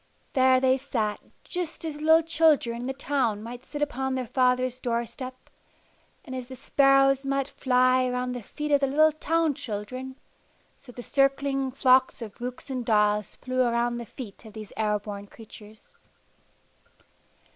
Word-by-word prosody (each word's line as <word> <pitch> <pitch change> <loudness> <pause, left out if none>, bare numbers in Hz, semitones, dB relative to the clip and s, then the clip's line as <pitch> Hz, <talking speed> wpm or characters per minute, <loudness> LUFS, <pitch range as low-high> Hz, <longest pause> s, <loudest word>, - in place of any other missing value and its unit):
There 260 -1 +5
they 260 0 +3
sat, 225 -6 -2 0.2
just 350 -2 -5
as 300 -2 -5
little 320 +1 +5
children 310 -7 +2
in 240 +2 -5
the - - -1
town 265 -6 -1
might 245 +2 -9
sit 295 -1 -3
upon 265 -2 -2
their 255 -1 -2
father's 255 +1 +1
door 235 -1 -1
step; 255 +1 -9 0.8
and 260 - -8
as 255 -1 -5
the 260 - -9
sparrows 275 0 +3
might 275 0 -1
fly 255 -1 +2
around 250 0 -2
the 245 -1 -5
feet 300 +7 -5
of 285 - +5
the 275 - +1
little 310 +3 +4
town 320 +1 0
children, 255 +4 -6 0.6
so 260 - -15
the 245 0 -9
circling 275 0 +1
flocks 260 0 +3
of 230 0 -9
rooks 250 +3 -6
and 255 -2 -2
daws 210 -2 +1
flew 255 0 -2
around 240 0 +1
the 235 - -7
feet 230 -4 -10
of 220 -2 -12
these 215 -2 -9
air 210 -1 +1
born 205 -1 -8
creatures. 215 0 -14
255 Hz, 165 wpm, -26 LUFS, 235-275 Hz, 0.8 s, There